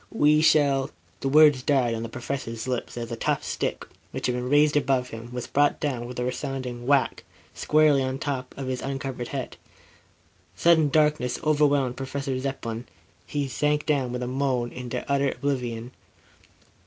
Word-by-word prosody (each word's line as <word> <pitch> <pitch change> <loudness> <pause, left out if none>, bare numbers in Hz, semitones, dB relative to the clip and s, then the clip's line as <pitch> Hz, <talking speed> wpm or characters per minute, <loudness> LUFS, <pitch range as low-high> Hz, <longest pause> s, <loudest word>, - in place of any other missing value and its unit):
We 150 -6 +4
shall 145 -4 +3 0.2
" 85 - -34
The 135 - 0
words 145 -2 +6
died 130 -4 +2
on 115 - -3
the 115 - -5
Professor's 120 -1 -5
lips, 125 -1 -3
as 115 -1 -4
the 115 - -3
tough - - -1
stick, - - -3 0.2
which - - -5
had 125 - +1
been 125 0 -3
raised 150 +1 +4
above 135 -3 +1
him, 115 +1 -9
was 125 -1 -4
brought 145 0 +2
down 125 -5 -2
with 125 - -8
a - - 0
resounding 125 -1 -4
whack, 140 -1 +2 0.3
squarely 150 -2 +3
on 130 0 -1
the - - -7
top 130 -3 -4
of 135 - -4
his 130 -1 -2
uncovered 135 -2 -4
head. 135 -1 -5 1.0
Sudden 160 - +4
darkness 150 -3 +2
overwhelmed 145 -4 +2
Professor 135 0 -3
Zepplin. 125 -3 -4 0.4
He 145 -2 -2
sank 150 +2 0
down 140 -5 +1
with 125 0 -3
a - - -3
moan, 130 -2 -1
into 125 0 -5
utter 140 0 +2
oblivion. 125 -3 -3
135 Hz, 175 wpm, -25 LUFS, 125-145 Hz, 1.0 s, words